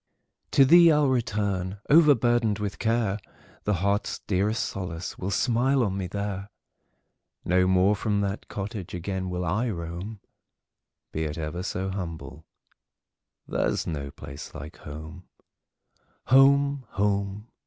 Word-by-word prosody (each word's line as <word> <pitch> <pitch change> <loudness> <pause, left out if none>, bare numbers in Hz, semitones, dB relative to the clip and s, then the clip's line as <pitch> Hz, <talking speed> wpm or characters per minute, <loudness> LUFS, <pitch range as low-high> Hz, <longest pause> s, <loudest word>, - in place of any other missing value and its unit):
To 135 - +7
thee 170 +3 +8
I 150 - +4
'll 145 -2 +3
return, 105 -6 -1
overburdened 120 -8 +4
with 105 -2 -4
care; 115 -3 +1 0.5
The 105 - +2
heart's 100 +1 0
dearest 105 +3 0
solace 90 -3 -5
will 95 - -3
smile 125 +5 +2
on 100 -4 -1
me 95 -2 -3
there; 100 +1 -4 1.0
No 90 +1 +3
more 95 +2 +4
from 105 0 0
that 100 +1 -3
cottage 100 -3 -5
again 95 +1 -3
will 90 0 -2
I 110 +9 0
roam; 90 +3 -5 0.9
Be 80 0 -2
it 75 0 -4
ever 80 +2 -4
so 95 0 -3
humble, 80 -5 -6 1.0
there - - 0
's - - -2
no 70 -4 -4
place 70 +1 -10
like 75 +4 -8
home. 80 +4 -9 1.0
Home! 140 0 +5
home! 100 +2 -1
100 Hz, 130 wpm, -26 LUFS, 90-115 Hz, 1.0 s, thee